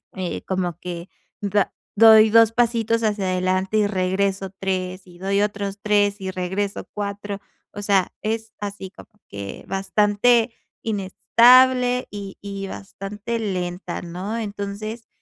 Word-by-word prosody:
eh, 185 -2 -3
como 180 -3 -2
que 175 0 -6 0.3
da 200 -1 +1 0.2
doy 220 0 +8
2 230 -1 +6
pasitos 230 -1 +1
hacia 210 -2 0
adelante 185 +2 0
y 210 - +4
regreso 195 0 0
3 185 -1 -2
y 175 -1 -16
doy 195 +2 +1
otros 205 -1 -2
3 205 -1 +2
y 190 0 -3
regreso 190 +2 -3
4, 205 0 -4 0.3
o 205 - -6
sea, 200 -2 +2
es 220 0 -3
así 200 -2 -6
como 195 - -15 0.2
que 100 -1 -7
bastante 210 +5 +2 0.3
inestable 245 +5 +4
y 200 -2 -7
y 200 -1 -5
bastante 205 +4 -6
lenta, 180 -4 -3
¿no? 185 +6 -5
Entonces, 215 +1 -5
200 Hz, 130 wpm, -22 LUFS, 190-215 Hz, 0.3 s, doy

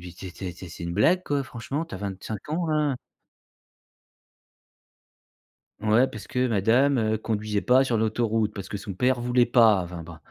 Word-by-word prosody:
«Mais 90 - -9
tu 95 +2 -10
es - - -7
tu 95 - -10
es 90 - -4
tu 90 - -11
es - - -10
c'est 85 +1 -10
une 85 - -3
blague 170 - +3
quoi? 145 -4 -1
Franchement, 135 +5 -5
tu 165 - -10
as 95 - -6
25 100 +3 -6
ans 165 +2 -1
hein». 150 -4 +1 2.8
Ouais 110 +4 +4
parce 110 -4 -9
que 125 0 0
madame, 120 +6 +3
heu, 110 -1 +1
conduisait 105 -1 -2
pas 125 +2 +5
sur 125 -4 0
l'autoroute 110 0 0
parce 95 -1 -7
que - - -4
son 100 0 -6
père 125 +4 +1
voulait 125 0 +3
pas 110 -5 +5
enfin, 85 -1 -7
bon. 85 0 -10
110 Hz, 200 wpm, -25 LUFS, 100-130 Hz, 2.8 s, pas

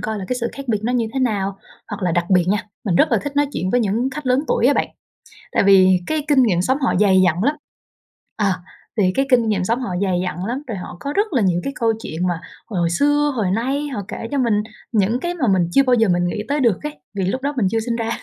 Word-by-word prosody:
coi 220 -1 -3
là 190 - -5
cái 250 - -1
sự 235 - -1
khác 275 -2 -9
biệt 215 -3 +1
nó 245 - 0
như 235 -3 +1
thế 265 - -2
nào. 200 -5 -1 0.3
Hoặc 205 -2 -6
là 175 -2 +1
đặc 175 +2 -1
biệt 180 -2 +4
nha, 205 +1 +2 0.3
mình 175 -4 +1
rất - - +3
là - - +4
thích 285 0 -6
nói 290 0 +3
chuyện 185 -5 -2
với 245 - +2
những 230 +5 0
khách 290 +1 -7
lớn 255 +1 +3
tuổi 240 - +2
á 285 - +4
bạn, - - 0 0.6
tại - - +2
vì 190 -2 +6
cái 310 -2 -1
kinh 275 -4 +4
nghiệm 180 -6 +2
sống 260 +7 +1
họ 250 - +2
dày 190 -2 +5
dặn 175 +3 +1
lắm. 290 +3 +2 0.8
Ờ. 205 -2 +2 0.5
Thì 185 -3 +3
cái 270 - +2
kinh 240 -3 +4
nghiệm 195 -3 0
sống 230 +6 0
họ 245 - -3
dày 185 -3 +1
dặn 180 0 -4
lắm, 255 +6 -3
rồi 220 - -4
họ 180 -1 -8
có 285 - -4
rất 410 -1 0
là 245 - +2
nhiều 175 -2 +1
cái 275 - -3
câu 225 -1 +2
chuyện 170 +3 -2
mà 175 -1 -2 0.3
hồi 175 -5 0
xưa, 290 +9 +2
hồi 200 -5 0
nay 270 +8 -1
họ 250 -8 -4
kể 230 - -6
cho 285 - -1
mình 225 -5 +2 0.3
những 220 +3 +1
cái 350 +3 -3
mà 260 -8 -1
mình 175 -2 +1
chưa 275 - +5
bao 255 -1 +2
giờ 225 -2 +3
mình 175 0 +2
nghĩ 210 +4 -3
tới 290 +1 0
được 230 -9 +2
ấy, 150 0 -6 0.2
vì 190 - 0
lúc 255 +8 -2
đó 285 +1 -1
mình 200 -6 +2
chưa 225 - +1
sinh 230 +1 -2
ra. 230 -1 -2
225 Hz, 280 wpm, -20 LUFS, 185-260 Hz, 0.8 s, vì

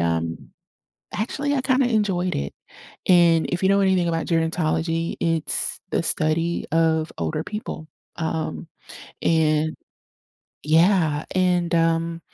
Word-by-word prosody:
um, 85 -1 -2 0.6
actually, 285 +6 -2
I 260 - 0
kinda 260 -1 +2
enjoyed 195 -5 0
it, 70 0 -3 0.5
and 170 -3 +5
if 175 +1 -2
you 190 - +4
know 200 0 +4
anything 185 -3 +2
about 165 -1 -2
gerontology, 165 0 0
it's 165 -2 0
the - - 0
study 165 +2 0
of 160 -1 +1
older 155 0 -2
people, 210 -7 -6 0.3
um, 160 0 -3 0.6
and 155 -1 +2 0.9
yeah, 160 -1 +3
and, 180 -2 +1
um, 165 0 +1
165 Hz, 115 wpm, -23 LUFS, 160-180 Hz, 0.9 s, and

